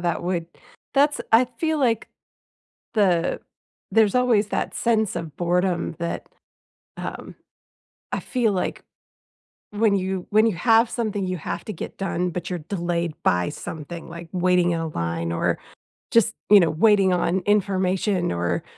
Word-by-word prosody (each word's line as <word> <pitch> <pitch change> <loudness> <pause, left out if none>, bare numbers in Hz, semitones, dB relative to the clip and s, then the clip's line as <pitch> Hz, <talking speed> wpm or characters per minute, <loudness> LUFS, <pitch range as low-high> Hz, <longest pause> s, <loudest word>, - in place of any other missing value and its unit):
that 170 -1 -1
would 175 -2 -2 0.5
that's 285 +1 +3
I 230 +3 +7
feel 315 -1 0
like 235 -5 +1 0.9
the 180 -6 +2 0.5
there's 220 -3 +4
always 235 -5 +3
that - - -2
sense 220 -3 +1
of 160 -4 -5
boredom 175 0 0
that, 170 0 -4 0.7
um, - - -7 0.8
I - - -1
feel 240 -5 0
like 185 - -2 0.9
when 210 -1 +2
you 190 -1 -2
when 215 +2 +5
you 215 - 0
have 225 +5 +4
something 210 -5 -2
you 185 -1 -2
have - - -5
to 215 - -5
get - - -7
done, 180 -2 -1
but 175 +1 -5
you're 180 -1 -3
delayed 170 -1 -2
by 90 -1 +2
something, 165 +2 -7
like 170 0 -9
waiting 180 -1 +2
in 165 - -1
a 165 - -2
line 85 - -3
or 85 - 0 0.5
just, 230 -1 +4 0.2
you 205 -1 +9
know, 165 -3 +3
waiting 195 +2 +4
on 180 +1 +1
information 190 -2 +1
or, 85 0 -1
185 Hz, 150 wpm, -23 LUFS, 170-215 Hz, 0.9 s, you